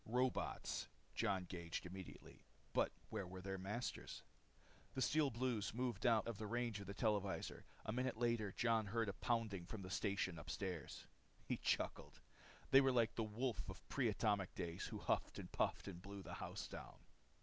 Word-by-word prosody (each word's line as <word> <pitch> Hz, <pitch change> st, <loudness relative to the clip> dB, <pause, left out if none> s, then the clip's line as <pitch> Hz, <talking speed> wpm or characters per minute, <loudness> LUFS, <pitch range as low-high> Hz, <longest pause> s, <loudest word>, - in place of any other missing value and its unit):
Robots! 125 Hz, +2 st, +1 dB, 0.3 s
Jon 100 Hz, -5 st, +1 dB
gauged 85 Hz, -1 st, -4 dB
immediately. 95 Hz, +1 st, -8 dB, 0.3 s
But -, -, +4 dB, 0.2 s
where 95 Hz, -, -1 dB
were 95 Hz, +1 st, -6 dB
their 95 Hz, 0 st, -3 dB
masters? 105 Hz, +6 st, -3 dB, 0.7 s
The 130 Hz, -, 0 dB
Steel 150 Hz, -1 st, +4 dB
Blues 115 Hz, -3 st, 0 dB
moved 125 Hz, 0 st, +1 dB
out 115 Hz, -3 st, +5 dB
of 115 Hz, -3 st, -3 dB
the 110 Hz, -, -2 dB
range 120 Hz, -1 st, 0 dB
of 100 Hz, -, -7 dB
the 100 Hz, -, -4 dB
televisor. 100 Hz, -3 st, 0 dB, 0.2 s
A -, -, 0 dB
minute 125 Hz, -1 st, +1 dB
later 115 Hz, -4 st, +2 dB
Jon 115 Hz, -1 st, +3 dB
heard 115 Hz, +1 st, +1 dB
a -, -, -1 dB
pounding 100 Hz, 0 st, 0 dB
from 105 Hz, -2 st, -5 dB
the 90 Hz, -, -6 dB
station 95 Hz, -4 st, +1 dB
upstairs. 90 Hz, +1 st, -3 dB, 0.4 s
He -, -, 0 dB
chuckled. -, -, 0 dB, 0.5 s
They 135 Hz, -, +10 dB
were 135 Hz, -1 st, +5 dB
like 115 Hz, -2 st, +4 dB
the 115 Hz, -, 0 dB
wolf 110 Hz, +1 st, -1 dB
of 95 Hz, -, -8 dB
pre 130 Hz, -4 st, +3 dB
atomic 105 Hz, -3 st, +2 dB
days 85 Hz, -1 st, -2 dB
who -, -, -4 dB
huffed -, -, +1 dB
and -, -, -6 dB
puffed -, -, +1 dB
to 100 Hz, -, -4 dB
blow 100 Hz, +3 st, -7 dB
the -, -, -6 dB
house -, -, -3 dB
down. -, -, -8 dB
105 Hz, 175 wpm, -43 LUFS, 95-120 Hz, 0.7 s, They